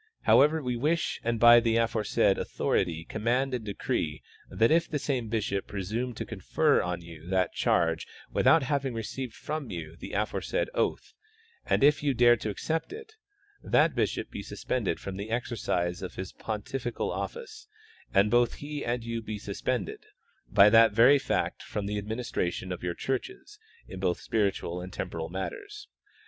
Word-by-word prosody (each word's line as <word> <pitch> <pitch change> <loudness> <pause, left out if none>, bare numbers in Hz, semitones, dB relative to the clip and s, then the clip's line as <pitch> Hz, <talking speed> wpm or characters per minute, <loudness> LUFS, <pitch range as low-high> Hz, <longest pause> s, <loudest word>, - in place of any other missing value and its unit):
However, 150 +2 +4
we 125 -1 -1
wish 155 +7 0
and 115 0 0
by 120 +1 +9
the 115 -1 +1
afore 115 -1 +1
said - - +2
authority 80 -1 -1
command 125 +7 0
and 125 -3 -2
decree 100 -2 -3 0.3
that 115 +4 +2
if 165 +1 +3
the 150 - -1
same 130 -5 -2
bishop 105 -3 -1
presume 110 +5 -3
to - - -4
confer - - +1
on 90 -1 -3
you 85 -1 -12
that 95 0 +1
charge 80 -1 +1 0.2
without 165 - +4
having 135 -2 -1
received 115 +2 -5
from 150 -4 -5
you 85 -4 -6
the - - -9
aforesaid - - -1
oath, - - -1 0.5
and - - +2
if 145 +1 +5
you 145 -2 +1
dare 120 0 +6
to 110 - -4
accept 160 - -2
it, 440 +1 -9 0.5
that - - +3
bishop - - -1
be - - -5
suspended 105 -10 -2
from 95 -1 -6
the 100 +2 -5
exercise 100 -7 -1
of 95 - -6
his 95 0 -6
pontifical 115 +3 -4
office 475 -2 -6 0.4
and 100 +1 +3
both 120 -1 +3
he 145 0 -6
and 120 0 -2
you 115 -1 -3
be 110 -1 -5
suspended, 100 +1 -3 0.5
by 100 0 +7
that 115 0 +6
very 125 +6 +6
fact, 135 - -1
from 105 - -4
the 105 +1 -2
administration 100 -4 -3
of 90 - -5
jouy 90 -1 -3
churches 130 -2 -4 0.3
in 95 - -8
both 90 -2 0
spiritual 100 -5 -1
and 90 +1 -8
temj)oral 80 -3 -4
matters. 410 - -6
115 Hz, 165 wpm, -28 LUFS, 95-130 Hz, 0.5 s, by